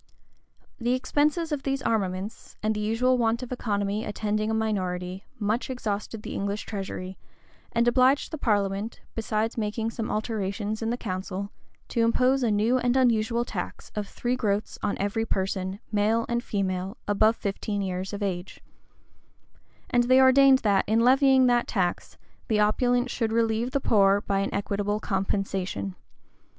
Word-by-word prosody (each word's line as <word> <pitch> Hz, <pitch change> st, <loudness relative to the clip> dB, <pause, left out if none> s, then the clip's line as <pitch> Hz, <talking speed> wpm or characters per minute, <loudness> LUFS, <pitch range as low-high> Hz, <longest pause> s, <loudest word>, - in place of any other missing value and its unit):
The 240 Hz, +1 st, +1 dB
expenses 300 Hz, +5 st, 0 dB
of 295 Hz, -2 st, -1 dB
these 270 Hz, 0 st, -2 dB
armaments, 200 Hz, -1 st, -2 dB
and 215 Hz, 0 st, +2 dB
the 210 Hz, -, -3 dB
usual 235 Hz, +4 st, +2 dB
want 230 Hz, +1 st, +1 dB
of 250 Hz, -, -8 dB
economy 205 Hz, -3 st, -1 dB
attending 215 Hz, +1 st, -1 dB
a -, -, 0 dB
minority, 185 Hz, -3 st, -2 dB
much 215 Hz, +5 st, -1 dB
exhausted 215 Hz, -3 st, -4 dB
the -, -, -6 dB
English 200 Hz, +1 st, -3 dB
treasury, 190 Hz, -2 st, -5 dB, 0.5 s
and 235 Hz, +1 st, +2 dB
obliged 255 Hz, +3 st, +3 dB
the 315 Hz, -, -5 dB
parliament, 205 Hz, -1 st, 0 dB
besides 225 Hz, +1 st, -1 dB
making 220 Hz, +1 st, -2 dB
some 225 Hz, -1 st, -4 dB
alterations 215 Hz, 0 st, -2 dB
in 225 Hz, -, -1 dB
the 240 Hz, -, -1 dB
council, 195 Hz, -1 st, -4 dB, 0.4 s
to 230 Hz, -, 0 dB
impose 250 Hz, +4 st, +3 dB
a 240 Hz, -, +2 dB
new 220 Hz, +5 st, +2 dB
and 245 Hz, +1 st, +1 dB
unusual 235 Hz, -1 st, +2 dB
tax -, -, -6 dB
of 210 Hz, -1 st, -3 dB
three 245 Hz, +4 st, -2 dB
groats 210 Hz, -4 st, -1 dB
on 205 Hz, -, -1 dB
every 205 Hz, +3 st, -1 dB
person, 190 Hz, -2 st, -2 dB
male 220 Hz, +2 st, +2 dB
and 235 Hz, 0 st, -1 dB
female, 190 Hz, 0 st, -2 dB
above 215 Hz, +2 st, +3 dB
fifteen 200 Hz, 0 st, -3 dB
years 185 Hz, 0 st, -3 dB
of 205 Hz, 0 st, -4 dB
age; 185 Hz, -1 st, -4 dB, 1.3 s
and 240 Hz, 0 st, +3 dB
they 255 Hz, +1 st, +5 dB
ordained 265 Hz, +1 st, +7 dB
that, 200 Hz, -3 st, +3 dB
in 225 Hz, +2 st, +3 dB
levying 265 Hz, +1 st, +5 dB
that 245 Hz, -1 st, +3 dB
tax, 180 Hz, -5 st, -2 dB, 0.3 s
the 215 Hz, -3 st, +1 dB
opulent 245 Hz, +4 st, +2 dB
should 225 Hz, -1 st, -1 dB
relieve 225 Hz, +1 st, +1 dB
the 275 Hz, +2 st, 0 dB
poor 200 Hz, -5 st, +4 dB
by 195 Hz, -1 st, 0 dB
an 195 Hz, -, -1 dB
equitable 205 Hz, +1 st, -1 dB
compensation. 195 Hz, -, -2 dB
215 Hz, 155 wpm, -26 LUFS, 200-240 Hz, 1.3 s, ordained